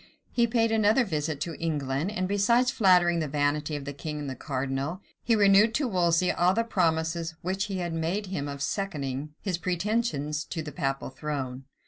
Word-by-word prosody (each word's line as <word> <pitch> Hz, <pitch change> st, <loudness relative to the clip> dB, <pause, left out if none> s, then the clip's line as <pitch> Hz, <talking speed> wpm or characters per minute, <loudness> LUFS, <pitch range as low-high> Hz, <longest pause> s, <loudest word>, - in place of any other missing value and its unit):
He 235 Hz, -1 st, +3 dB
paid 225 Hz, -1 st, +2 dB
another 220 Hz, +3 st, +4 dB
visit 155 Hz, -5 st, -2 dB
to 165 Hz, +1 st, -2 dB
England; 145 Hz, 0 st, -1 dB
and 185 Hz, -3 st, -2 dB
besides 235 Hz, +6 st, +3 dB
flattering 180 Hz, -5 st, +4 dB
the 155 Hz, -, -1 dB
vanity 145 Hz, +1 st, 0 dB
of 145 Hz, -1 st, -5 dB
the 140 Hz, -, -5 dB
king 150 Hz, +2 st, -5 dB
and 145 Hz, -1 st, -5 dB
the 130 Hz, -, -4 dB
cardinal, 135 Hz, +5 st, -3 dB, 0.2 s
he 230 Hz, -, +2 dB
renewed 205 Hz, +2 st, +5 dB
to 285 Hz, -2 st, +1 dB
Wolsey 180 Hz, -3 st, +2 dB
all 180 Hz, +2 st, +2 dB
the 230 Hz, -, +2 dB
promises 165 Hz, -5 st, 0 dB
which 190 Hz, +3 st, -1 dB
he 195 Hz, -2 st, -4 dB
had 175 Hz, -2 st, -3 dB
made 165 Hz, +6 st, -1 dB
him 180 Hz, -7 st, -3 dB
of 140 Hz, 0 st, -4 dB
seconding 150 Hz, -6 st, -3 dB
his 180 Hz, -4 st, -2 dB
pretensions 175 Hz, -5 st, -1 dB
to 165 Hz, -3 st, -4 dB
the 150 Hz, -, -6 dB
papal 135 Hz, -1 st, -2 dB
throne. 135 Hz, -3 st, -4 dB
165 Hz, 185 wpm, -27 LUFS, 145-195 Hz, 0.2 s, renewed